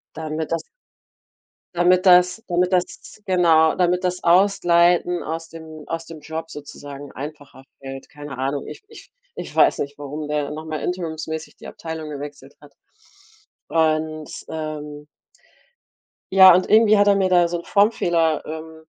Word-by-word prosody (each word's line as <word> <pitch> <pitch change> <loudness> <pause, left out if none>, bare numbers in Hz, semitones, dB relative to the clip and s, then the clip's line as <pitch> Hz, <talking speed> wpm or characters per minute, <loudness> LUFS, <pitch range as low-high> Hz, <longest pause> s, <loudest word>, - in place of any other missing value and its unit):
Damit 155 0 -4
das 165 -1 -1 1.1
damit 180 +2 +3
das 180 +3 +5
damit 180 +1 +1
das 180 +3 -3
genau, 165 -4 +4
damit 180 0 +1
das 180 0 -2
Ausleiten 175 -1 +3
aus 165 +1 -5
dem 160 -2 -11
aus 165 0 -4
dem 165 -2 -10
Job 160 +1 -7
sozusagen 145 -1 -10
einfacher 145 -1 -10 0.2
fällt. 135 0 -9
Keine 145 -2 -9
Ahnung, 135 +2 -3
ich - - -10
ich 445 - -15 0.3
ich - - -7
weiß - - +4
nicht, 140 0 -5
warum 150 +1 -6
der 150 -1 -2
noch 155 +1 -7
mal 155 -2 -4
interimsmäßig 160 -3 -5
die - - -13
Abteilung 160 -2 -7
gewechselt 145 -1 -9
hat. 145 -2 -18 0.9
Und, 155 -1 0 0.2
ähm 150 -2 -6 1.3
ja, 190 -2 +9
und 185 - +2
irgendwie 215 -1 +6
hat 205 0 +4
er 200 - +5
mir 195 -1 +1
da 175 -2 +4
so 170 0 -3
'n 170 - -10
Formfehler, 175 -7 +2
ähm, 160 0 -9
160 Hz, 150 wpm, -21 LUFS, 150-180 Hz, 1.3 s, ja